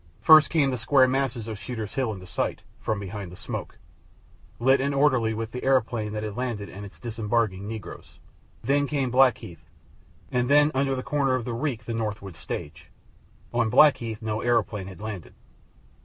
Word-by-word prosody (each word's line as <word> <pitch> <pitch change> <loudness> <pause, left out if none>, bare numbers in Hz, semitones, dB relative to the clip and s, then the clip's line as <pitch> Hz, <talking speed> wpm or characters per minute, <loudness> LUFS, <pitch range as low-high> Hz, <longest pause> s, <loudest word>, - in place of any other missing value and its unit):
First 155 -1 +7
came 145 -5 +2
the 125 - -3
square 130 +3 +4
masses 130 -3 -1
of 110 -3 -5
Shooter's 110 -4 -6
Hill 130 -4 0
into 95 -3 -8
sight, - - -3 0.2
from 110 -2 -2
behind 100 -2 -6
the - - -10
smoke, - - -6 0.8
lit 130 +2 +4
and 140 +1 0
orderly 130 -6 +3
with 115 0 -4
the 125 - -6
aeroplane 120 -5 +1
that 105 0 -3
had 105 -2 -5
landed 120 -5 -3
and 100 +2 -9
its 100 - -11
disembarking 110 -3 -1
negroes. 110 -2 -8 0.5
Then 145 +1 +2
came 135 -3 -1
Blackheath, 125 - +2 0.7
and 125 0 0
then 145 +1 +5
under 135 0 +1
the 130 - -4
corner 140 -3 +1
of 125 -3 -3
the 120 - -3
reek 120 -2 -3
the 115 - -4
Norwood 105 -5 -4
stage. 80 -1 -7 0.6
On 120 -2 +2
Blackheath 120 -4 +4
no 110 0 -2
aeroplane 110 -5 0
had 95 -3 -10
landed. 105 -5 -7
115 Hz, 175 wpm, -26 LUFS, 105-130 Hz, 0.8 s, First